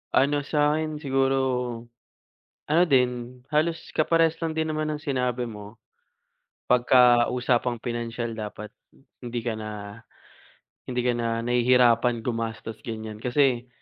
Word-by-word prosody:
Ano 145 +2 +3
sa 150 +1 +1
'kin 155 -1 -4
siguro, 135 0 +1 1.3
ano 160 +4 +4
din 125 -4 0
halos 155 +2 +1 0.2
kaparehas 165 +1 +3
lang 160 - -1
din 160 0 -1
naman 155 0 -2
ng 150 - -5
sinabi 125 -4 -1
mo. 105 0 -11 0.9
'Pagka 125 -1 +5
usapang 125 -1 0
pinansiyal 115 -1 -4
dapat 105 0 -6 0.5
hindi 120 -1 -4
ka 115 -1 -3
na, 110 0 -6 1.2
hindi 125 -1 -2
ka 125 - +2
na 120 -1 -2 0.2
nahihirapan 120 -1 +3
gumastos 115 -2 -4
ganiyan. 110 -2 -7
Kasi, 125 0 +1
125 Hz, 120 wpm, -25 LUFS, 115-145 Hz, 1.3 s, Pagka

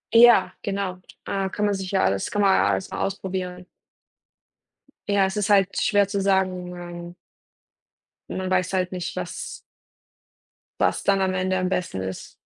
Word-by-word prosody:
Ja, 230 -6 +7
genau. 195 -2 -2 0.3
Äh, 195 -1 -1
kann 210 +1 -1
man 205 - +2
sich 190 -1 -4
ja 195 - +2
alles 95 0 +1
kann 205 - 0
man 195 -1 +5
ja 100 - +3
alles 95 -1 -1
mal - - -4
ausprobieren. 185 -2 -3 1.4
Ja, 200 -1 +3
es 190 +1 -3
ist 210 -1 -1
halt 195 -1 +3
schwer 205 -1 +3
zu 200 0 -1
sagen. 185 -2 +1
Man 175 -1 -8 1.2
man 185 0 -3
weiß 185 0 +1
halt 185 -1 0
nicht, 180 -2 -4
was - - -5 1.2
was - - +1
dann 195 -1 +3
am 190 0 +1
Ende 185 0 0
am 185 0 0
besten 180 - -2
ist. 95 -1 -6
190 Hz, 165 wpm, -24 LUFS, 180-195 Hz, 1.4 s, Ja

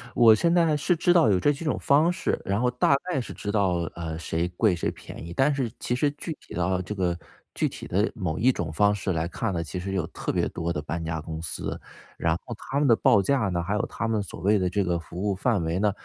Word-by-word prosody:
我 115 -2 +7
现 170 +10 +2
在 165 -3 +4
是 175 +5 +1
知 175 +2 +3
道 165 -10 +5
有 95 -3 +3
这 145 - +3
几 150 +3 -5
种 150 - 0
方 150 +5 +4
式， 180 - -1
然 100 +1 0
后 125 - +3
大 125 +3 +3
概 180 -7 -1
是 120 - -6
知 105 - -4
道， 90 -5 +1
呃， 80 -2 -4
谁 85 +1 -1
贵 90 +2 +2
谁 85 - -1
便 - - -10
宜。 85 - -7
但 135 +9 +3
是 130 -5 -2
其 120 - -1
实 145 +3 +1
具 155 +3 -6
体 - - -13
到 90 +1 0
这 95 +3 -5
个 90 -4 -1 0.4
具 - - +1
体 - - -8
的 100 +5 +1
某 90 -9 -3
一 125 +5 +4
种 85 -9 -4
方 100 +6 +3
式 100 -1 -2
来 80 -1 -1
看 110 +4 -2
呢， 85 -1 -1
其 85 +3 -5
实 95 +2 -4
有 95 -4 0
特 - - -4
别 - - 0
多 85 +1 -3
的 75 - -2
搬 80 +3 -4
家 80 0 -2
公 80 0 -6
司。 80 - -4 0.4
然 80 0 +1
后 120 - -6
他 135 +4 -3
们 145 - +3
的 115 - +6
报 100 -2 +4
价 105 +1 +1
呢， 85 -1 -1
还 95 +4 -2
有 105 +2 0
他 115 - -3
们 110 -2 0
所 100 - -8
谓 105 +2 +3
的 90 -1 +1
这 100 +2 0
个 90 -2 0
服 85 +1 -9
务 - - +2
范 100 -2 +1
围 80 +3 -1
呢， 105 0 +3
100 Hz, 290 characters per minute, -26 LUFS, 85-125 Hz, 0.4 s, 我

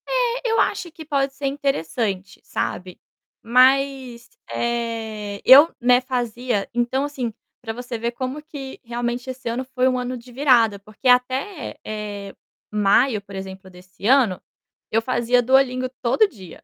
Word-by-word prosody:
Eh, - - 0
eu 450 - +2
acho 345 - 0
que 315 0 -11
pode 275 -2 0
ser 275 0 -3
interessante, 215 - -2
sabe, 180 -1 -4 0.4
mas, 255 0 +2 0.2
eh, 225 -3 -3
eu, 285 +6 +9
né, 245 +1 +5
fazia 245 -4 -2
então, 245 +3 0
assim, 255 -6 -4 0.3
para 225 -2 -5
você 245 0 -6
ver 235 +1 -2
como 255 +4 -5
que 285 -4 -9
realmente 240 +1 -3
esse 255 -1 -7
ano 240 +3 -2
foi 255 0 0
um 255 -1 +1
ano 250 0 -3
de 245 +1 -14
virada, 240 -6 +3
porque 215 +5 -6
até, 255 +6 +1
eh, 205 -2 -6 0.4
maio, 210 +3 +3
por 200 0 -12
exemplo, 190 0 -8
desse 185 +2 -14
ano, 240 -8 +4 0.5
eu 225 - +2
fazia 245 0 +2
Duolingo 255 0 +2
todo 335 - +3
dia. 190 - -13
245 Hz, 150 wpm, -22 LUFS, 220-265 Hz, 0.5 s, eu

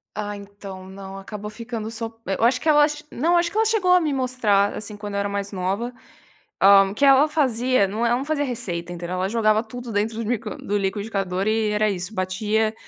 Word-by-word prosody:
Ah, 205 -1 -4
então 200 -2 -10
não 195 0 -9
acabou 210 +1 -7
ficando 225 0 -6
sop 225 0 -6
eu 195 +3 -2
acho 240 +3 +3
que 320 - -2
ela 295 -1 +6 0.3
não 335 +7 +2
acho 345 0 +2
que 410 - -10
ela 445 - +4
chegou 415 -5 +2
a 360 - +6
me 305 -4 0
mostrar, 240 -7 +1
assim, 210 0 -5
quando 205 -1 -6
eu 200 - 0
era 200 - -1
mais 200 0 -3
nova, 195 +6 -2 0.7
hã, 195 0 +7
que 280 +6 +2
ela 275 +2 +6
fazia 255 -7 +2
não, 220 +4 -2
eh, - - +3
ela 240 - +3
não 265 - -4
fazia 295 -1 0
receita 190 -10 -4
entendeu? 175 +1 -5
Ela 185 +1 -1
jogava 215 -1 +2
tudo 245 +1 -8
dentro 215 +2 -1
do 215 - -4
liqui 230 -3 -2 0.2
do 205 +1 0
liquidificador 195 -1 -2
e 220 0 +1
era 210 0 +2
isso 185 +1 -4
batia, 215 +3 0
215 Hz, 220 wpm, -23 LUFS, 200-245 Hz, 0.7 s, hã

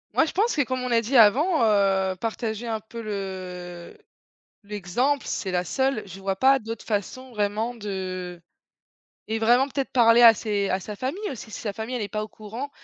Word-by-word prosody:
Moi, 325 - +5
je - - -4
pense 435 +5 +1
que, 295 - +2
comme 255 -1 -2
on 250 - -3
a 230 -1 +4
dit 240 +3 +1
avant, 275 - +5
heu, 195 -3 +2
partager 225 +2 -3
un 220 -1 -2
peu 225 +2 -9
le 185 -4 -6 0.7
l'exemple, 210 +8 -1
c'est 190 - -3
la 180 -1 +1
seule 265 +3 0
je 190 0 -10
vois 195 0 -2
pas 270 +5 +5
d'autres 225 -1 -7
façons, 235 +5 -3
vraiment, 215 +2 -1
de 185 -4 -5 0.9
et 220 +1 -2
vraiment, 240 +4 +4
peut-être, 275 -1 -3
parler 235 -1 +5
à 230 -1 +10
ses 205 -2 -1
à 185 - +1
sa 210 +3 -7
famille 260 - -4
aussi, 220 -3 -9
si - - -7
sa 210 - -3
famille, 220 +5 -4
elle 235 - -3
est 205 - -3
pas 215 +2 -3
au 215 - -6
courant. 225 +7 -7
220 Hz, 200 wpm, -25 LUFS, 195-250 Hz, 0.9 s, à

